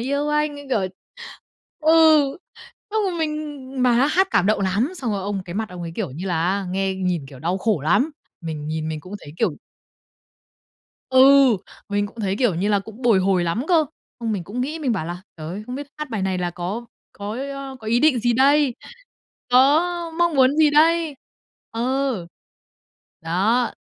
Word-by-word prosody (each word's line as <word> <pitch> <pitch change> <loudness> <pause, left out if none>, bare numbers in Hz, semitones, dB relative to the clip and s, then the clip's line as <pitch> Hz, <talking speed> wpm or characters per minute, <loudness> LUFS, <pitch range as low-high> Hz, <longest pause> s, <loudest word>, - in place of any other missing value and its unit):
yêu 280 +4 -1
anh." 300 0 +1
Như 285 - -9
kiểu 220 - +2 1.0
ừ, 315 +1 +4 1.0
xong 435 0 +1
rồi 365 - -3
mình 295 -4 -4
mà 250 -1 +4
há 250 +4 +4
hát 375 +5 +2
cảm 185 - +2
động 215 -1 +2
lắm, 200 - 0
xong 250 -7 -3
rồi 195 - -2
ông 195 -1 -3
cái 175 -1 -8
mặt 220 0 -2
ông 180 -1 -7
ấy, 165 -1 -6
kiểu - - -3
như 170 +8 -6
là, 165 -2 0
á, 195 0 -1
nghe 190 0 -1
nhìn, 180 -6 -2
kiểu, 135 -2 -12
đau 175 +5 -1
khổ 210 -6 0
lắm. 215 - +2 0.3
Mình 155 -2 -5
nhìn 155 0 -3
mình 155 -1 -4
cũng 185 +6 -10
thấy, 145 - -11
kiểu 185 -11 0 1.5
Ừ. 260 - +3 0.7
Mình 205 0 0
cũng 225 +2 -11
thấy, 195 -1 -1
kiểu 240 -9 +2
như 195 +5 -1
là, 205 - +3
cũng 220 +5 -12
bồi 230 -5 +4
hồi 185 -2 +2
lắm 190 +10 -1
cơ. 325 -3 +4 0.4
Xong 225 -2 -1
mình 185 -5 -3
cũng 235 +5 -5
nghĩ, 300 +5 -3
mình 275 -7 0
bảo 165 -7 -2
là 175 +1 -6
"Trời 155 -1 -7
ơi, 195 +5 -5
không 250 - -6
biết 285 +1 -5
hát 300 -1 -5
bài 215 -4 -2
này 190 -1 -1
là 175 -1 -1
có 185 +7 -5 0.3
có 205 +1 -6
ý, 270 +3 -4
ơ, 275 -1 -7
có 220 - -10
ý 235 +2 +2
định 295 -4 +4
gì 240 +1 +2
đây? 275 +1 +4 0.8
Có 325 +7 +3
mong 340 -2 +2
muốn 265 +2 +4
gì 310 -2 +5
đây?" 320 +1 +3 0.6
Ờ. 250 -5 -1 0.9
Đó. 205 +9 +1
225 Hz, 200 wpm, -22 LUFS, 185-280 Hz, 1.5 s, gì